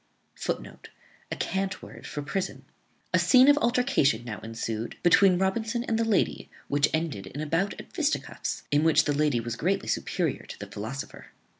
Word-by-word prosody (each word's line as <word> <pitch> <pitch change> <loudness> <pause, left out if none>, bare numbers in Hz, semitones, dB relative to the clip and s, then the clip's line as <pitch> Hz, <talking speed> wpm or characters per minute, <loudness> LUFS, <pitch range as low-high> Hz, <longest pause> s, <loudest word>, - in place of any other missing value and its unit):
[Footnote: - - -5 0.4
A - - -1
cant 195 0 -2
word - - -10
for 145 - -4
a - - -7
prison.] 180 +7 -3 0.5
A - - +5
scene 255 0 +6
of 290 - +8
altercation 240 - +2
now 110 -3 -5
ensued 115 0 -4
between 180 +1 +6
Robinson 220 +5 0
and 225 -2 -1
the - - +3
lady, 225 -4 0 0.2
which 145 +1 +3
ended 155 - -2
in 135 - -8
a 155 - -2
bout 165 +6 0
at - - -11
fisticuffs, 315 -3 -2
in 145 +1 +3
which 160 -1 +5
the 145 - 0
lady 145 -4 +2
was 115 0 -4
greatly 190 +10 0
superior 170 -7 -1
to - - -8
the 100 - -7
philosopher. 110 +7 -7
160 Hz, 180 wpm, -27 LUFS, 125-200 Hz, 0.5 s, of